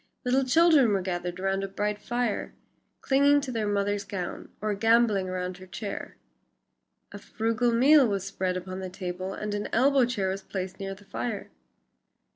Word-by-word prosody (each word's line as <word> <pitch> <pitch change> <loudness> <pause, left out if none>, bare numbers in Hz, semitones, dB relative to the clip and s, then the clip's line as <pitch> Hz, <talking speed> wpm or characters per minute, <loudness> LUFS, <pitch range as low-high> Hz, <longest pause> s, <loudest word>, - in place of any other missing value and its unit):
Little 260 +2 +3
children 295 -5 +5
were 195 -2 0
gathered 175 -1 -3
round 195 +1 0
a - - -2
bright 205 +2 -2
fire, 240 -3 -2 0.5
clinging 285 +1 +4
to 270 -2 -5
their 225 -3 -1
mother's 205 0 0
gown, 180 -3 -5
or 215 0 -1
gamboling 220 -2 +3
round 185 0 -4
her 185 - -12
chair. 200 +2 -6 0.9
A 200 - -8
frugal 225 +3 0
meal 270 +3 +6
was 200 -3 -2
spread 185 -2 -2
upon 185 +1 -6
the 190 -1 -5
table 185 0 -5
and 210 0 -4
an 205 0 -3
elbow 265 +2 +4
chair 210 -6 -1
was 195 +1 -3
placed 190 -1 -5
near 195 0 -4
the 200 +1 -18
fire. 220 +1 -4
205 Hz, 170 wpm, -27 LUFS, 190-235 Hz, 0.9 s, meal